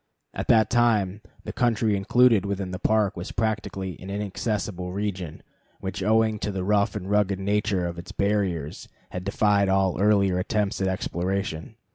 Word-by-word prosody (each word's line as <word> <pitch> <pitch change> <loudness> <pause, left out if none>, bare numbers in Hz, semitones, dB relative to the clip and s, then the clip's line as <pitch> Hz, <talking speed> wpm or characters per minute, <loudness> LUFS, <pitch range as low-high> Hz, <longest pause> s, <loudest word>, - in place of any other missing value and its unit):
At - - -4
that 110 -1 +4
time 110 -5 +2 0.2
the - - -6
country 115 -3 +1
included 110 +2 +4
within 100 -2 -3
the 90 - -5
Park 105 -2 +2
was 90 +1 -6
practically 100 -5 -3
an 95 - -9
inaccessible 100 -2 -3
region, 95 -5 -4 0.4
which, 95 +1 -5
owing 110 +1 +2
to 105 - -2
the 95 -2 -3
rough 100 +1 +1
and 95 -3 -5
rugged 100 -1 +2
nature 100 -1 0
of 85 0 -4
its 85 - -9
barriers, 95 -7 -1 0.2
had 90 - -5
defied 100 0 +2
all 95 -1 +1
earlier 100 -3 +3
attempts 100 +1 -1
at 95 - +1
exploration. 95 -2 -3
100 Hz, 160 wpm, -25 LUFS, 95-105 Hz, 0.4 s, that